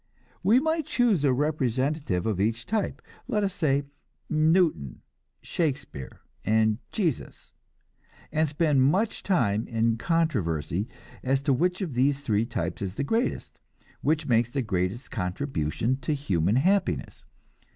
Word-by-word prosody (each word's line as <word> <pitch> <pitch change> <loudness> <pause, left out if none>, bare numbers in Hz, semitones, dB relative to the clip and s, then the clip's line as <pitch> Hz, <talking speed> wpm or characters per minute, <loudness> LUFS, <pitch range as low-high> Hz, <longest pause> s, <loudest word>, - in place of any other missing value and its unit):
We 215 +7 +5
might 315 +1 0
choose 225 - +2
a 140 - +4
representative 135 - 0
of 105 -4 0
each 115 +3 0
type 215 -3 -2 0.2
let 210 -1 0
us 195 -2 0
say 145 -5 +1 0.5
Newton, 155 - +2 0.4
Shakespeare 140 - -3 0.2
and 110 +1 +2
Jesus 175 - -3 0.8
and 155 0 +1
spend 150 -2 +2
much 190 - +2
time 115 - +1
in 115 0 +1
controversy 105 - 0 0.3
as 135 +1 0
to 140 - +3
which 180 +8 +1
of 170 -8 -3
the 130 +4 +3
three 115 -6 -1
types 90 -6 -3
is 95 -1 -3
the 140 - -1
greatest, 225 - -1 0.4
which 155 +1 +1
makes 120 -3 +2
the 135 +1 -2
greatest 95 +3 -2
contribution 95 - -1
to 150 +2 -1
human 100 - +1
happiness. 190 +10 +1
135 Hz, 130 wpm, -27 LUFS, 110-160 Hz, 0.8 s, We